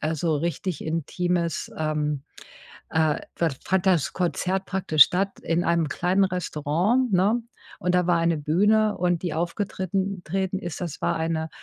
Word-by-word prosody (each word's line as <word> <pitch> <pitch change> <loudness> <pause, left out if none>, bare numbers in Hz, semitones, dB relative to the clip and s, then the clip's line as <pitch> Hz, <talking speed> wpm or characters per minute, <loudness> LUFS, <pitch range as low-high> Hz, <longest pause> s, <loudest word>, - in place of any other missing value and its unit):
also 160 +1 0
richtig 170 +1 -3
intimes, 170 +2 -1
ähm, 150 -2 -1 0.7
äh, 160 -1 +2 0.2
f 160 -6 0
fand 190 0 0
das 170 -9 +2
Konzert 185 +2 -1
praktisch 170 -7 +5
statt 195 +2 -2
in 170 +1 0
einem 170 -2 +2
kleinen 180 +6 +1
Restaurant, 180 - 0
ne? 205 +6 +3 0.4
Und 180 -2 +1
da 180 -1 +3
war 175 -1 +3
eine 165 -1 +2
Bühne 205 +8 +2
und 175 -1 0
die 175 -4 -2
aufgetritten 190 +2 -2
treten 190 +3 -2
ist, 175 -1 -6
das 170 -4 -5
war - - +1
eine, 160 0 -2
175 Hz, 150 wpm, -25 LUFS, 160-190 Hz, 0.7 s, praktisch